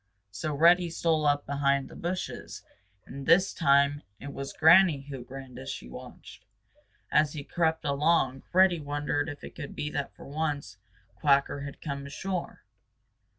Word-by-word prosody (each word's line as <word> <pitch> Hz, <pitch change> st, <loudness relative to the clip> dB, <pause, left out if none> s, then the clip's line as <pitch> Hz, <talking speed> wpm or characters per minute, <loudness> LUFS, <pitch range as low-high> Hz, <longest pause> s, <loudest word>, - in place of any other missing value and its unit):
So 155 Hz, +7 st, -3 dB
Reddy 170 Hz, +3 st, +5 dB
stole 160 Hz, -2 st, +1 dB
up 145 Hz, 0 st, +2 dB
behind 140 Hz, -1 st, +1 dB
the -, -, -13 dB
bushes, 175 Hz, -, -5 dB, 0.4 s
and 135 Hz, +1 st, -8 dB
this 180 Hz, +4 st, +5 dB
time 140 Hz, -1 st, +3 dB, 0.2 s
it 140 Hz, 0 st, -8 dB
was 140 Hz, 0 st, -5 dB
Granny 160 Hz, -2 st, +6 dB
who 135 Hz, -3 st, -8 dB
grinned 130 Hz, -1 st, -10 dB
as 130 Hz, +1 st, -7 dB
she 60 Hz, -, -6 dB
watched. 60 Hz, -, -11 dB, 0.7 s
As 150 Hz, -1 st, +3 dB
he 150 Hz, -3 st, -6 dB
crept 160 Hz, 0 st, 0 dB
along, 140 Hz, -2 st, +2 dB
Reddy 185 Hz, -1 st, +5 dB
wondered 145 Hz, +1 st, -2 dB
if 145 Hz, -1 st, -9 dB
it -, -, -9 dB
could 145 Hz, -4 st, -8 dB
be 150 Hz, -, -3 dB
that 140 Hz, -2 st, -4 dB
for -, -, -13 dB
once 145 Hz, -9 st, -3 dB, 0.4 s
Quacker 140 Hz, -1 st, +2 dB
had 140 Hz, -, -9 dB
come 140 Hz, -2 st, -4 dB
ashore. 180 Hz, +5 st, -5 dB
145 Hz, 155 wpm, -28 LUFS, 140-160 Hz, 0.7 s, Granny